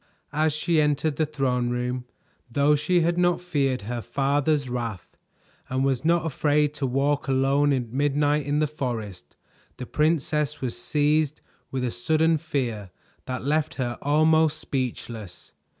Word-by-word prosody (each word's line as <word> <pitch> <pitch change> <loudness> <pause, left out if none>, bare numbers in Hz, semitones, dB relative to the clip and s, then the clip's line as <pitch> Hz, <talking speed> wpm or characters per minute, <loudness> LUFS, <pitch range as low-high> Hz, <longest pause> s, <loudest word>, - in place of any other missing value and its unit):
As 155 +1 +2
she 155 +2 +1
entered 150 0 +1
the 155 - +1
throne 130 -5 0
room, 125 +1 -2 0.4
though 140 +4 +3
she 175 +4 +2
had 170 +1 +1
not 175 0 +3
feared 140 - -1
her 120 +3 -4
father's 140 +2 0
wrath 120 -6 -5 0.5
and 130 +1 0
was 130 -2 0
not 165 0 +2
afraid 150 -1 +1
to 140 -2 -2
walk 140 +2 0
alone 135 +2 +3
at 125 -4 -1
midnight 145 +2 +1
in 145 +1 +1
the 155 - +3
forest, 120 -10 -5 0.4
the 130 - -6
princess 150 0 0
was 125 -3 -3
seized 150 +4 +1 0.3
with 130 -1 -3
a 125 - -1
sudden 160 +6 +2
fear 115 -10 -3 0.4
that 130 0 -4
left 155 +2 0
her 120 -3 -2
almost 155 +1 +3
speechless. 115 - -5
140 Hz, 150 wpm, -25 LUFS, 125-155 Hz, 0.5 s, though